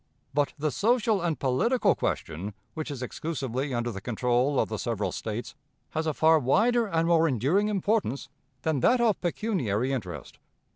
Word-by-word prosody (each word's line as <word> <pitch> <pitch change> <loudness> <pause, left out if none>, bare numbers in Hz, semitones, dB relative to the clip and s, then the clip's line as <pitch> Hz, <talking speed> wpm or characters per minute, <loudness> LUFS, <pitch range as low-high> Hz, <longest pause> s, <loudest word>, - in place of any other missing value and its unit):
But 145 0 +1
the 150 0 -1
social 225 - +2
and 170 -3 0
political 140 - +2
question 95 +6 -3 0.2
which 155 -1 -4
is 135 -3 -5
exclusively 135 -1 -3
under 120 -1 -1
the 95 -3 -7
control 125 +5 +1
of - - +2
the 110 -2 -4
several 110 -4 -2
States 115 +3 -5 0.4
has 160 0 -2
a 155 - +1
far 160 0 +5
wider 225 - +3
and 165 -3 +1
more 165 -1 +4
enduring 145 - +2
importance 200 - 0 0.4
than 160 -3 +1
that 250 - +4
of 230 -4 +2
pecuniary 145 - -1
interest. 90 - -6
145 Hz, 160 wpm, -27 LUFS, 120-185 Hz, 0.4 s, far